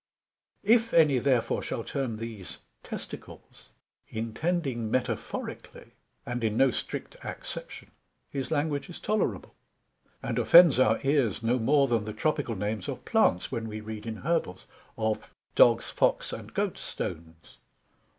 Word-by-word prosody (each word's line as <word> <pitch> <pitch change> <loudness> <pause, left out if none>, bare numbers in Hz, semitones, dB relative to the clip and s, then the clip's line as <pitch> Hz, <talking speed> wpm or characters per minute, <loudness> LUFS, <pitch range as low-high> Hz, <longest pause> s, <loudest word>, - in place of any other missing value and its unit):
If 230 +2 +3
any 150 -6 +6
therefore 125 -2 +1
shall - - -4
term 130 -6 -3
these 110 -4 -7 0.2
testicles, - - -10 0.4
intending 120 +1 -2
metaphorically, 125 -2 -4 0.3
and 120 -1 -3
in 110 -1 0
no 135 -1 +5
strict - - -5
acception; - - -7 0.4
his 135 -2 -4
language 145 -2 -1
is 175 - -8
tolerable, 215 0 -1 0.7
and - - -1
offends 170 -6 +8
our 110 -3 +4
ears 135 -7 +1
no 120 +3 +2
more 140 +4 +4
then 115 -3 +1
the 110 - -5
Tropical 145 0 -1
names 105 0 -3
of - - -6
Plants: 90 - +2
when 115 -1 -3
we 110 0 -5
read 110 0 -7
in 110 - -3
Herbals, 140 - -2 0.3
of 110 -1 -1 0.2
Dogs, - - +5
Fox, - - +1
and - - -7
Goat - - -1
stones. 80 0 -7
120 Hz, 135 wpm, -28 LUFS, 110-145 Hz, 0.7 s, offends